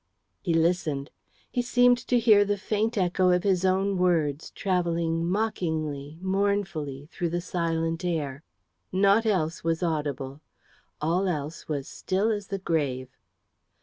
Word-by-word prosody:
He 170 -3 0
listened. 160 -4 +1 0.4
He 245 - +1
seemed 245 0 +4
to 245 - +3
hear 220 -3 +6
the 205 0 0
faint 215 +3 -1
echo 185 0 +2
of 180 0 +3
his 190 -2 +2
own 190 +1 +2
words 160 -5 +1
travelling 170 -3 0
mockingly, 160 -8 -2
mournfully, 190 -8 -1
through 175 - -2
the 175 +1 -1
silent 165 -1 -1
air. 150 -6 -2 0.5
Naught 200 +4 +4
else 165 -6 0
was 165 +1 0
audible. 145 -4 -2 0.6
All 175 +5 +1
else 155 -2 -3
was 140 -3 -3
still 195 +4 0
as 205 -2 -3
the 195 - -3
grave. 140 -8 -1
175 Hz, 135 wpm, -27 LUFS, 155-195 Hz, 0.6 s, hear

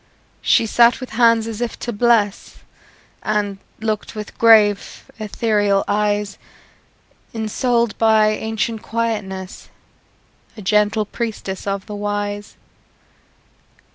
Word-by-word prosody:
She - - +3
sat 235 +2 +4
with 255 - -8
hands 230 -1 +4
as 225 0 -6
if 240 - -3
to 240 - -5
bless, 215 -2 +1 0.6
And 205 -2 -1 0.2
looked 220 0 -3
with 210 -1 -7
grave, 215 -3 +4 0.2
ethereal 205 -2 +1
eyes; 205 -1 -1 1.0
Ensouled 235 +1 0
by 220 -1 +4
ancient 220 +1 -2
quietness, 210 -5 -4 0.9
A - - -8
gentle 210 +2 +2
priestess 205 -4 -5
of 195 0 -2
the 210 - -8
Wise. 205 0 -4
215 Hz, 105 wpm, -20 LUFS, 205-230 Hz, 1.0 s, sat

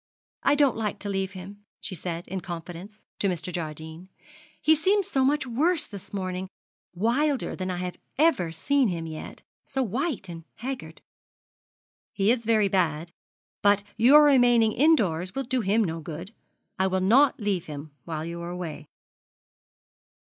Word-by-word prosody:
'I - - +3
don't 285 -5 +3
like 215 -2 -2
to 205 - -6
leave 195 0 -2
him,' 200 +2 -10 0.2
she 200 - -5
said, 170 -1 -5
in 190 0 -4
confidence, 175 +3 -8
to 200 - +2
Mr. 180 -1 -3
Jardine; 160 +2 -6 0.5
'he 315 - +5
seems 385 +6 +2
so 270 -9 +1
much 290 +2 +2
worse 305 +7 +1
this 200 -3 -10
morning 185 -1 -3 0.5
wilder 255 - +1
than 185 0 -4
I 180 - -2
have 180 0 -5 0.2
ever 275 - +3
seen 270 - +2
him 170 -4 -3
yet 155 -1 -8
and - - -37 0.2
so 270 -1 -1
white 250 - -2
and 165 -1 -8
haggard.' 260 +2 -6 1.1
'He 200 +2 +3
is 235 -2 0
very 215 -2 +3
bad, 170 -4 0 0.5
but 205 0 +4
your 270 +7 +7
remaining 245 -5 +5
indoors 195 - +2
will 270 - -1
do 255 0 -1
him 215 +2 +2
no 165 -4 -3
good. 165 +6 -8 0.5
I 190 - +3
will 190 0 0
not 245 +10 +4
leave 200 -5 -1
him 150 0 -7
while 160 -2 -4
you 170 +1 -6
are 170 - -5
away.' 175 -4 -6
195 Hz, 160 wpm, -26 LUFS, 175-255 Hz, 1.1 s, your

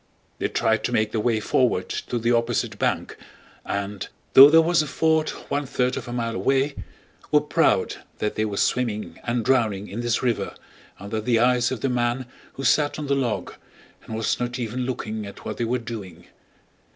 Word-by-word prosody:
They - - 0
tried 110 -2 +1
to - - -1
make 110 -2 +1
their 110 - -1
way 115 -1 +1
forward 110 -3 +1
to 120 - -3
the 115 +1 +1
opposite 115 -1 0
bank - - -1 0.5
and, 100 -1 -4 0.3
though 135 +2 +11
there 160 +2 +7
was 170 0 +3
a 155 - -3
ford 160 +2 +1
one 145 -1 -4
third 125 0 0
of 125 - -6
a - - -5
mile 115 -1 -2
away, 135 +3 +1 0.6
were - - +5
proud - - +1 0.2
that 105 - -1
they 110 - -1
were 105 -2 -3
swimming 110 -3 -1
and 120 -1 -1
drowning 110 -6 +1
in 100 +5 -6
this 120 0 0
river 120 -3 -1 0.4
under 100 +3 -4
the 115 +1 +2
eyes 125 0 +3
of 125 -4 -4
the - - +1
man 120 +1 0 0.3
who 135 - -7
sat 145 +3 +2
on 150 - -4
the 140 - +1
log 125 -5 -2 0.5
and 110 - -7
was 110 0 0
not 125 +1 -2
even 125 +1 -3
looking 110 -4 -4
at 100 - -12
what - - -4
they 120 - -1
were 125 +2 0
doing. 100 -8 -8
120 Hz, 195 wpm, -24 LUFS, 110-130 Hz, 0.6 s, though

